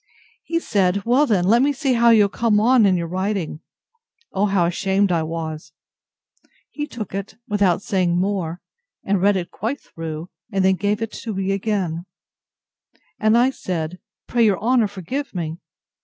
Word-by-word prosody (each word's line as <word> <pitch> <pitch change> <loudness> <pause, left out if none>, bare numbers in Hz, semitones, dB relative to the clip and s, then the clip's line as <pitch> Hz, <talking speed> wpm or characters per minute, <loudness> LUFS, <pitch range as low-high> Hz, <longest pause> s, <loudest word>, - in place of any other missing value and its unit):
He 335 0 -1
said, 200 - +1
Well 260 +5 +4
then, 200 -7 +2
let 230 +5 +4
me 285 +2 +3
see 275 -1 0
how 235 0 +4
you 220 -3 +6
are - - -2
come 215 0 +2
on 235 -1 +5
in 185 -2 +3
your 170 - -2
writing! 185 -2 -2 0.7
O 205 +2 +1
how 195 -3 +2
ashamed 190 +3 +1
I 170 -2 +2
was!—He 160 - -9
took 215 -9 -7
it, 195 +1 -5
without 200 -4 +2
saying 180 -3 +1
more, 180 -3 -1 0.4
and 195 -2 0
read 200 +1 +4
it 175 -2 -4
quite 235 +8 -3
through, 165 +1 -7 0.2
and 195 -2 +1
then 190 - +5
gave 205 +3 -1
it 225 - -6
me 195 -2 -1
again;—and 195 +3 -4
I 250 +2 +4
said, 180 -6 -4 0.3
Pray 240 -1 +1
your 205 -3 +3
honour 235 0 +3
forgive 205 - -5
me! 165 -1 -4
200 Hz, 160 wpm, -21 LUFS, 180-225 Hz, 0.7 s, you